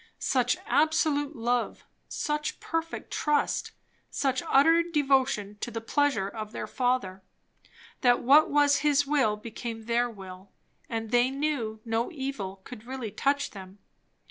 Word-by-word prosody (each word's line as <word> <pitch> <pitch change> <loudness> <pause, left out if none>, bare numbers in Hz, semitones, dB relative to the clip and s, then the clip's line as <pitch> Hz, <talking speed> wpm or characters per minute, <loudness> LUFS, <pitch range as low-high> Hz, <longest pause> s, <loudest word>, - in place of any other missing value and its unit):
Such - - +1
absolute 305 -1 +1
love, 240 +1 -1 0.3
such 300 0 -2
perfect 330 0 -4
trust, 300 -1 0 0.4
such 265 -2 0
utter 325 +5 +5
devotion 270 -10 +1
to - - -3
the 230 - -4
pleasure 270 -3 +1
of 215 +1 -7
their - - -4
Father, 245 -7 -1 0.8
that 245 -1 +3
what 285 +5 +6
was 290 0 +4
his 290 -1 +2
will 275 -8 +2
became 225 +1 -7
their 240 +1 +1
will, 190 -3 -11 0.4
and 225 -1 -4
they 245 +1 +4
knew 270 -6 -2
no 225 +1 -1
evil 265 - -5
could 250 -5 -11
really 255 -5 -5
touch 280 +5 0
them? 190 -1 -11
250 Hz, 135 wpm, -28 LUFS, 220-290 Hz, 0.8 s, what